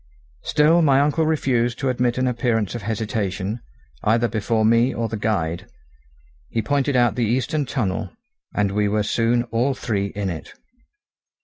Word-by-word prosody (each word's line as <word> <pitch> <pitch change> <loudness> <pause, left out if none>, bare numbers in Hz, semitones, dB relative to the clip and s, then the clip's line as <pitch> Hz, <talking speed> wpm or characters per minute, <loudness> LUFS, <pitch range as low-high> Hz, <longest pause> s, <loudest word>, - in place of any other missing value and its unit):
Still 160 +3 +3
my 140 -4 +4
uncle 150 +3 +2
refused 125 -6 +1
to 135 0 -1
admit 125 -1 0
an 130 - +1
appearance 115 -4 0
of 120 - -5
hesitation, 105 -1 -2 0.4
either 115 +2 +2
before 110 0 0
me 115 +3 +4
or 115 0 -2
the 110 - -4
guide; 85 -6 -2 0.8
he 115 - -1
pointed 145 -1 0
out 120 -3 +4
the 120 +1 0
Eastern 130 +6 0
tunnel, 105 -6 -2 0.4
and 100 -1 0
we 105 +1 +1
were 105 +1 +1
soon 115 +3 +1
all 125 +4 +1
three 100 -5 -1
in 100 -2 -3
it. 80 - -8
115 Hz, 155 wpm, -22 LUFS, 105-130 Hz, 0.8 s, my